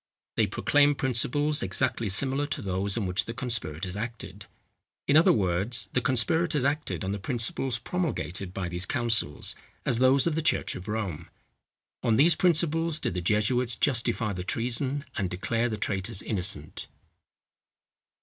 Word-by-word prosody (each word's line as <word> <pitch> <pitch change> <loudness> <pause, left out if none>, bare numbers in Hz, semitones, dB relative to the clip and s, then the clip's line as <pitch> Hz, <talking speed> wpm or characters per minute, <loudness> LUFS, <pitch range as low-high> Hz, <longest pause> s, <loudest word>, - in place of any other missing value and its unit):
They - - +2
proclaim 145 0 +3
principles 140 +4 +1
exactly 110 +3 -1
similar 135 +8 +1
to 150 - -3
those 95 +1 -2
on 110 - -1
which 95 +4 0
the 115 - -6
conspirators 95 - -2
acted;—in 115 +5 -6
other 160 - +7
words, 100 +4 0
the 125 - +2
conspirators 130 +5 +1
acted 145 -5 -1
on 95 - -2
the 100 - -3
principles 120 +2 -1
promulgated 110 - -3
by 90 -1 -4
these 90 +1 -3
councils, 115 -11 -1 0.3
as 115 - +1
those 130 +1 +5
of 170 - +1
the 160 - 0
church 160 - +1
of 90 - -8
Rome. 100 -7 -4 0.7
On 115 - +2
these 160 +8 +5
principles 165 -1 +2
did - - -2
the 90 - -2
jesuits 115 +6 +2
justify 120 -5 +1
the 90 -1 -4
treason, 125 +7 -1
and 95 -5 -1
declare 115 +7 -1
the 110 - -3
traitors 95 -1 -2
innocent. 90 -7 -2
115 Hz, 150 wpm, -27 LUFS, 95-140 Hz, 0.7 s, other